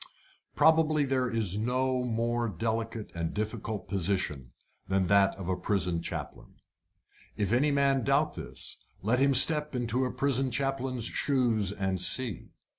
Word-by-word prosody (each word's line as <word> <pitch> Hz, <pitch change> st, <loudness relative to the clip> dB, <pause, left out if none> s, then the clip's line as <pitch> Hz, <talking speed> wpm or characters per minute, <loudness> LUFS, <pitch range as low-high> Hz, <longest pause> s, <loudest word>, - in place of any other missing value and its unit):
Probably 155 Hz, -2 st, +3 dB
there 130 Hz, -2 st, 0 dB
is 105 Hz, -4 st, -1 dB
no 130 Hz, +2 st, 0 dB
more 120 Hz, 0 st, -1 dB
delicate 115 Hz, +3 st, -3 dB
and 85 Hz, -1 st, -4 dB
difficult 110 Hz, 0 st, -4 dB
position 90 Hz, -9 st, -2 dB, 0.4 s
than 95 Hz, 0 st, +1 dB
that 100 Hz, +1 st, +3 dB
of 95 Hz, -3 st, -7 dB
a 95 Hz, -, 0 dB
prison 90 Hz, -4 st, -1 dB
chaplain. -, -, -7 dB, 0.8 s
If 100 Hz, +1 st, 0 dB
any 140 Hz, +5 st, +3 dB
man 140 Hz, -2 st, +2 dB
doubt 140 Hz, +4 st, +1 dB
this, -, -, -8 dB, 0.2 s
let 115 Hz, +5 st, +1 dB
him 140 Hz, 0 st, +3 dB
step 150 Hz, +2 st, +4 dB
into 120 Hz, +1 st, -1 dB
a 125 Hz, -, -1 dB
prison 135 Hz, -1 st, 0 dB
chaplain's 130 Hz, -1 st, -1 dB
shoes 120 Hz, -8 st, +1 dB
and 95 Hz, -3 st, -2 dB
see. 105 Hz, +2 st, +2 dB
115 Hz, 140 wpm, -29 LUFS, 100-135 Hz, 0.8 s, step